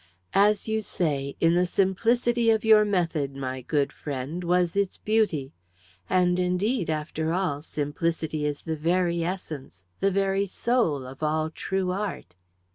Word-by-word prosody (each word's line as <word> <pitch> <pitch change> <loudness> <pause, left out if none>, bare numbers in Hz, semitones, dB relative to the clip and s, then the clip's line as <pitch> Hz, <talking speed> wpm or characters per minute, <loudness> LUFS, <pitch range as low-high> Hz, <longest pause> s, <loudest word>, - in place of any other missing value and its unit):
"As 205 +1 +3
you 220 0 0
say, 140 -8 -2
in 165 0 +4
the 180 +1 +3
simplicity 230 +6 +2
of 220 0 +2
your 215 -1 +7
method, 165 -9 0
my 130 -1 -4
good 140 +2 0
friend, 145 +5 -5
was 175 0 +1
its 200 -2 0
beauty. 205 -11 0 0.6
And 180 -1 +3
indeed, 180 +3 0
after 155 +1 -2
all, 170 -6 -1
simplicity 155 +1 -2
is 145 -1 -2
the 160 -1 -2
very 170 +2 +1
essence, 155 - -6
the 195 - +3
very 195 +1 +1
soul, 185 - 0
of 130 +2 -10
all 155 +1 0
true 190 +2 -2
art 190 - -4
eh?" 90 0 -43
175 Hz, 150 wpm, -26 LUFS, 150-195 Hz, 0.6 s, your